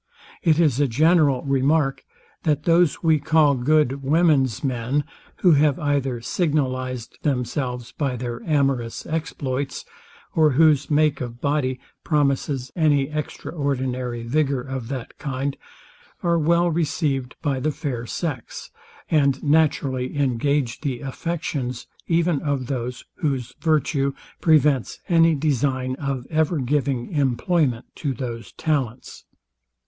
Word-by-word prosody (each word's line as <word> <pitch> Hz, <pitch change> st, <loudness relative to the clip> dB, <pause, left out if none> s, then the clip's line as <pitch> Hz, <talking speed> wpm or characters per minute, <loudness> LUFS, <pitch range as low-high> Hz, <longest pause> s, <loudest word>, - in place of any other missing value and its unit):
It 160 Hz, -2 st, +3 dB
is 150 Hz, -6 st, +3 dB
a 145 Hz, -, +3 dB
general 150 Hz, +1 st, +3 dB
remark, 135 Hz, +1 st, +1 dB, 0.4 s
that 150 Hz, -2 st, 0 dB
those 170 Hz, -1 st, +3 dB
we 160 Hz, -2 st, +4 dB
call 150 Hz, 0 st, +4 dB
good 140 Hz, +1 st, +2 dB
women's 140 Hz, -, +2 dB
men, 130 Hz, +2 st, 0 dB, 0.4 s
who 180 Hz, -, +7 dB
have 145 Hz, -2 st, +4 dB
either 140 Hz, -4 st, -1 dB
signalized 130 Hz, -4 st, -2 dB
themselves 125 Hz, -2 st, -2 dB
by 140 Hz, -4 st, -2 dB
their 120 Hz, -1 st, -5 dB
amorous 135 Hz, -7 st, 0 dB
exploits, 140 Hz, -4 st, -3 dB, 0.5 s
or 155 Hz, -3 st, +4 dB
whose 150 Hz, -1 st, +4 dB
make 150 Hz, -2 st, +2 dB
of 120 Hz, -1 st, -6 dB
body 135 Hz, -2 st, 0 dB, 0.2 s
promises 140 Hz, -3 st, 0 dB
any 145 Hz, -4 st, +2 dB
extraordinary 130 Hz, -5 st, -3 dB
vigour 140 Hz, +1 st, 0 dB
of 130 Hz, -2 st, -5 dB
that 130 Hz, -2 st, -6 dB
kind, 135 Hz, 0 st, -3 dB, 0.7 s
are 170 Hz, -1 st, +2 dB
well 170 Hz, +2 st, +3 dB
received 150 Hz, -5 st, -1 dB
by 140 Hz, -4 st, 0 dB
the 150 Hz, -, 0 dB
fair 135 Hz, -6 st, -4 dB
sex, 145 Hz, -7 st, -5 dB, 0.4 s
and 140 Hz, -4 st, +2 dB
naturally 145 Hz, -4 st, +1 dB
engage 135 Hz, -1 st, 0 dB
the 130 Hz, -5 st, -3 dB
affections 135 Hz, -3 st, -3 dB, 0.2 s
even 170 Hz, -3 st, +2 dB
of 140 Hz, -3 st, -1 dB
those, 125 Hz, -1 st, -4 dB
whose 135 Hz, -6 st, -2 dB
virtue 145 Hz, -3 st, +1 dB, 0.3 s
prevents 150 Hz, -5 st, +3 dB
any 165 Hz, -2 st, +5 dB
design 135 Hz, -3 st, 0 dB
of 140 Hz, -4 st, -3 dB
ever 160 Hz, +1 st, +1 dB
giving 135 Hz, -2 st, -1 dB
employment 140 Hz, -2 st, +1 dB
to 140 Hz, -4 st, -3 dB
those 120 Hz, -2 st, -6 dB
talents. 135 Hz, -7 st, -3 dB
140 Hz, 120 wpm, -23 LUFS, 130-155 Hz, 0.7 s, who